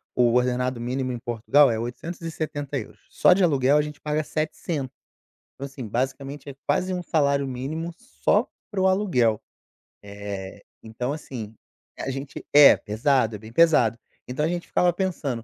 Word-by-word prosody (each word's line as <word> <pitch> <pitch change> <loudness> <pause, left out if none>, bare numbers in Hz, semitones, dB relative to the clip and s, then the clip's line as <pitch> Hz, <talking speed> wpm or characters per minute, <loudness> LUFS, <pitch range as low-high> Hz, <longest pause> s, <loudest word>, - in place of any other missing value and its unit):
o 120 -1 +3
ordenado 125 0 +1
mínimo 130 +1 -2
em 120 - -4
Portugal 120 +5 +3
é 110 - -1
€870. 145 0 -5
Só - - +4
de 190 0 +2
aluguel, 140 -3 +4
a - - +4
gente 150 -1 -7
paga 150 +1 -1
700. 155 -3 -3 0.6
Então, 140 - -6
assim, 135 -4 -8
basicamente, 135 +5 -3
é 135 - -9
quase 180 +6 +1
um 180 - -3
salário 140 -4 +1
mínimo 150 +7 -4
só 245 +7 0 0.2
pro 190 -2 +1
aluguel, 165 - +2 0.6
eh, 100 -1 -7 0.2
então, 125 +5 -3
assim, 115 -8 -7 0.4
a - - -3
gente 135 +1 -7
É, 145 -1 +9
pesado, 115 +1 +1
é - - -8
bem 110 +1 -12
pesado. 120 -7 +4 0.3
Então, 130 +5 -1
a - - +2
gente 175 +1 -3
ficava 175 -1 +2
pensando: 155 - -2
135 Hz, 155 wpm, -24 LUFS, 120-155 Hz, 0.6 s, É